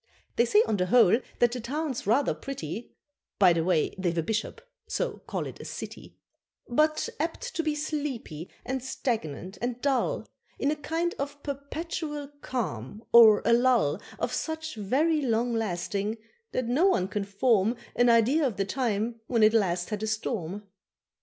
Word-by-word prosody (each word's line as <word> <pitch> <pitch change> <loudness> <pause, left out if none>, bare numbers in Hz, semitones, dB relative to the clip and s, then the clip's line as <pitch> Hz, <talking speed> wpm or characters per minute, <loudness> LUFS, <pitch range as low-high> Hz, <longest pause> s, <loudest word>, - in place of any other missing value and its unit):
They 235 - +4
say 420 - +5
on 215 - +1
the 180 -1 0
whole 230 0 +6 0.2
that 240 -1 +4
the 250 - -4
town's 270 0 -3
rather 260 +6 +3
pretty 230 - -6 0.4
(By 185 -4 +6
the 165 -1 0
way 170 -3 +1
they've 175 -2 0
a 165 - +1
bishop, 220 - -2 0.3
so - - -2
call - - -2
it - - -8
a - - -8
city); - - -8 0.5
But 310 +5 +2
apt 340 +10 -3
to - - 0
be 310 -2 -1
sleepy, 285 - -4 0.2
and 265 -1 -3
stagnant 200 - -3
and 245 0 -2
dull, 270 -1 0 0.3
In 280 - +1
a - - 0
kind 330 +3 -2
of 285 +1 -5
perpetual 295 +1 -4
calm, 205 - -4
or 225 -3 +8
a 235 - +5
lull 235 - +3 0.2
Of 250 - -2
such 315 +3 -3
very 285 +10 +1
long 240 -2 +1
lasting, 205 0 -2 0.3
that 255 - -1
no 270 +11 +3
one 185 - +2
can 200 +1 -2
form 205 +2 +2 0.2
An 245 0 +4
idea 235 +7 +4
of 225 - -5
the 195 - 0
time 230 0 -1
when 230 -3 +2
it 215 +1 +6
last 180 -4 +1
had 210 -1 -2
a 220 - -1
storm. 210 -3 -3
235 Hz, 170 wpm, -28 LUFS, 205-280 Hz, 0.5 s, or